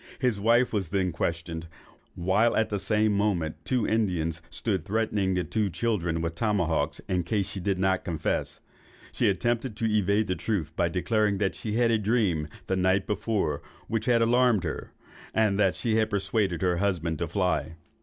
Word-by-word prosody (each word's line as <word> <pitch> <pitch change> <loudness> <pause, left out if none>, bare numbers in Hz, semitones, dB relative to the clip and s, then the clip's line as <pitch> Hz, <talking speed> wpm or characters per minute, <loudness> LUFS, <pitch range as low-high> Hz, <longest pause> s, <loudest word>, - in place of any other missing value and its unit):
His 125 -7 0
wife 115 +4 +3
was 95 -6 -1
then 95 0 0
questioned, 80 0 -3 0.5
while 95 +7 +2
at 110 - +2
the 105 - -1
same 105 +2 +2
moment 100 -6 0
two 125 -4 0
Indians 90 -7 0
stood 95 -7 -2
threatening 105 -2 0
the 90 - 0
two 105 0 -1
children 85 -3 -1
with 85 0 -2
tomahawks 85 -7 0
in 90 -2 +1
case 100 +2 -1
she 100 - -6
did 95 0 0
not 95 0 +1
confess. 80 -3 -2 0.5
She - - +2
attempted 120 +4 -1
to 115 - -2
evade 105 0 +2
the 95 - -1
truth, 95 -5 -2
by 85 - +1
declaring 105 +3 +1
she 105 - -5
had 115 +1 +3
a 110 - +2
dream 100 -8 +1 0.2
the 95 - 0
night 95 +1 +2
before 105 -7 -1 0.3
which 115 0 -2
had 120 -2 +4
alarmed 120 -3 +3
her, 80 - -4 0.4
and 105 -2 +2
that 95 -3 +3
she 115 -3 0
had 110 -1 +2
persuaded 100 -3 0
her 90 -1 +2
husband 85 -5 -1
to 85 - -1
fly. 85 -2 -1
100 Hz, 175 wpm, -27 LUFS, 85-110 Hz, 0.5 s, had